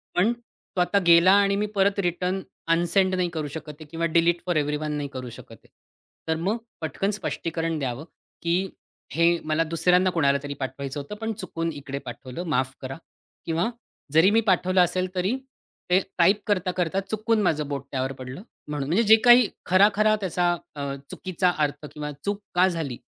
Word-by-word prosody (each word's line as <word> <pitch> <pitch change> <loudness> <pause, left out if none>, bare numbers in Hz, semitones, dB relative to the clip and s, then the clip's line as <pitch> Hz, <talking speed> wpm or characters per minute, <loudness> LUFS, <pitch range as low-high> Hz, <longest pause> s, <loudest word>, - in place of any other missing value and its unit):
पण 195 +6 +3
तो 235 -5 -7
आता 180 +3 +2
गेला 170 +2 +7
आणि 200 0 +2
मी 205 +1 0
परत 200 0 +2
रिटर्न 180 +1 -1 0.3
अनसेंड 175 +3 +2
नाही 180 -1 0
करू 155 -3 -4
शकत 155 +1 -7
आहे 155 - -10
किंवा 170 0 -1
डिलीट 170 +1 +2
फोर 175 - 0
एव्हरीवन 150 0 0
पण - - -2
नाही 145 - -3
करू 130 -1 -6
शकत - - -12
आहे. - - -24 0.6
तर 160 - +1
मग 200 +6 0 0.2
पटकन 160 +6 -1
स्पष्टीकरण 165 -5 -3
द्यावं, 135 +1 -3 0.4
की 175 +3 0 0.4
"हे 170 +1 +3
मला 155 +1 +1
दुसऱ्यांना 180 +3 +3
कोणालातरी 145 -4 +1
पाठवायचं 135 +2 -4
होतं, 145 +9 -7
पण 225 +1 -3
चुकून 165 -5 -4
इकडे 140 -1 -6
पाठवलं, 130 +5 -7
माफ 130 -1 0
करा 135 +1 -6 0.5
किंवा 170 +5 0 0.4
जरी 160 +5 +6
मी 225 +2 +4
पाठवलं 185 0 +3
असेल 185 +1 +1
तरी 190 +7 +1 0.5
ते 180 +1 +5 0.2
टाइप 190 +4 +4
करता-करता 185 -2 0
चुकून 215 +2 0
माझं 155 -5 +1
बोट 140 -1 -4
त्यावर 130 0 -1
पडलं 130 +7 -7 0.3
म्हणून." 145 -2 -3
म्हणजे 195 +8 +3
जे 220 0 +8
काही 240 -2 +7 0.2
खरा-खरा 205 +3 +4
त्याचा 180 -2 +1 0.2
अ, 140 -1 -3 0.2
चुकीचा 185 0 0
अर्थ 150 0 -1
किंवा 150 0 -5
चूक 205 0 -2
का 180 +1 +5
झाली? 160 -9 -3
170 Hz, 175 wpm, -25 LUFS, 150-190 Hz, 0.6 s, जे